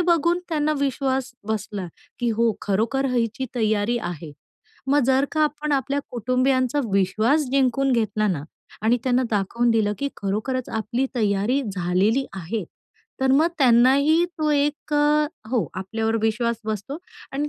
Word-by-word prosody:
बघून 340 0 +2
त्यांना 305 -1 +1
विश्वास 265 -1 -1 0.2
बसला, 210 -3 -3 0.3
की 240 -1 0
हो 230 -1 +3
खरोखर 230 +7 0
हिची 245 +2 -1
तयारी 220 0 +1
आहे. 170 -6 -6 0.5
मग 285 +2 +3
जर 265 +1 +3
का 310 - 0
आपण 300 0 -1
आपल्या 280 +1 0
कुटुंबियांचा 255 +3 +1
विश्वास 215 +10 +2
जिंकून 270 0 +2
घेतला 215 -2 +1
ना, 155 -7 -1 0.4
आणि 235 +3 +3
त्यांना 255 0 +2
दाखवून 230 +4 +1
दिलं, 215 -2 +2
की 280 - -1
खरोखरच 220 +6 -2
आपली 230 +4 -1
तयारी 215 +5 +1
झालेली 190 +9 +1
आहे. 190 +3 -4 0.6
तर 265 0 +2
मग 310 +5 +4
त्यांनाही 275 +6 +5
तो 305 -1 +1
एक 295 +1 0
अ, 295 +1 +3 0.2
हो 245 -4 +1
आपल्यावर 220 +4 -2
विश्वास 235 +1 0
बसतो 220 +7 -4 0.3
आणि 290 +2 -2
245 Hz, 140 wpm, -23 LUFS, 215-275 Hz, 0.6 s, त्यांनाही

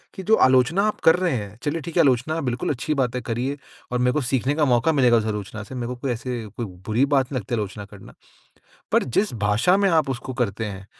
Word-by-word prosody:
कि 190 - -7
जो 220 +4 +4
आलोचना 130 +9 +3
आप 215 - -2
कर 160 - +7
रहे 180 -2 0
हैं, 105 -2 -6
चलिए 155 +3 -2
ठीक 170 +4 -6
है - - +7
आलोचना 140 +4 +1
बिल्कुल 125 -2 -2
अच्छी 145 +3 -1
बात 130 -4 -1
है 125 - -2
करिए 125 +4 -3 0.3
और 125 - 0
मेरे 125 0 +3
को 150 - 0
सीखने 130 +2 0
का 155 -1 +2
मौक़ा 125 +3 +3
मिलेगा 125 -6 +4
उस 110 - 0
आलोचना 105 0 -4
से, 130 - -10
मेरे 120 -2 -3
को 125 - -4
कोई 125 +1 -3
ऐसे 120 -1 -4
कोई 120 - -2 0.2
बुरी 115 +5 +2
बात 140 -2 +1
नहीं 130 - -1
लगती 115 +2 -4
आलोचना 105 -1 -4
करना। 100 -1 -14 0.8
पर - - +3
जिस 195 - 0
भाषा 105 - +3
में 200 0 +2
आप 160 -4 +2
उसको 130 0 -5
करते 115 -3 -2
हैं, 100 -2 -7
125 Hz, 245 wpm, -23 LUFS, 115-145 Hz, 0.8 s, कर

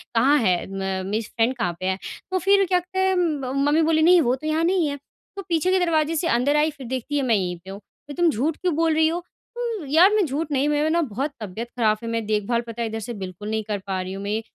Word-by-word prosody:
कहाँ 270 +6 +5
है 185 -6 +1
म 190 -1 -3
मेरी 220 - 0
फ़्रेंड 230 +3 -1
कहाँ 175 -7 -1
पे 185 - -4
है? 190 0 0 0.3
तो 375 - +1
फिर 395 +2 +4
क्या 360 0 +2
कहते 370 +2 -6
है 380 0 +2
म 300 -8 -1
मम्मी 310 +2 +3
बोली, 315 0 +2
"नहीं 350 +2 +6
वो 250 -3 +2
तो 310 +4 -7
यहाँ 310 +1 +1
नहीं 345 -2 +2
है।" 285 - -3 0.4
तो - - -3
पीछे 335 +2 +1
के 375 - +3
दरवाज़े 320 -1 +1
से 330 +2 0
अंदर 285 +4 +1
आई 310 - +2
फिर 275 -5 -10
देखती 260 +3 -3
है 275 - +1
मैं 235 -3 +3
यहीं 180 -3 -1
पे - - -10
हूँ। 195 +1 -7 0.3
तो 290 - -7
तुम 345 - +5
झूठ 295 +4 -1
क्यों 360 -4 -1
बोल 325 0 +2
रही 315 0 +4
हो 330 +2 -1 0.4
उम, 460 -8 -3
यार 345 +8 +6
मैं 425 -3 +3
झूठ 300 +2 -3
नहीं 280 +1 +1
मैं 295 +1 +1
ना 340 +2 +2
बहुत 275 +1 -3
तबियत 215 +3 -5
ख़राब 215 -3 +2
फ़ि 230 +2 -8
मैं 230 -1 -2
देखभाल 215 +3 0
पता 230 +1 -6
है 230 - 0
इधर 220 0 -4
से 235 +3 -6
बिल्कुल 185 +3 -7
नहीं 220 0 -1
कर 210 -1 -3
पा 190 -1 -1
रही 185 +1 -5
हूँ 195 +1 -6
मैं 205 - -3
ये 220 - -1
280 Hz, 280 wpm, -23 LUFS, 220-325 Hz, 0.4 s, नहीं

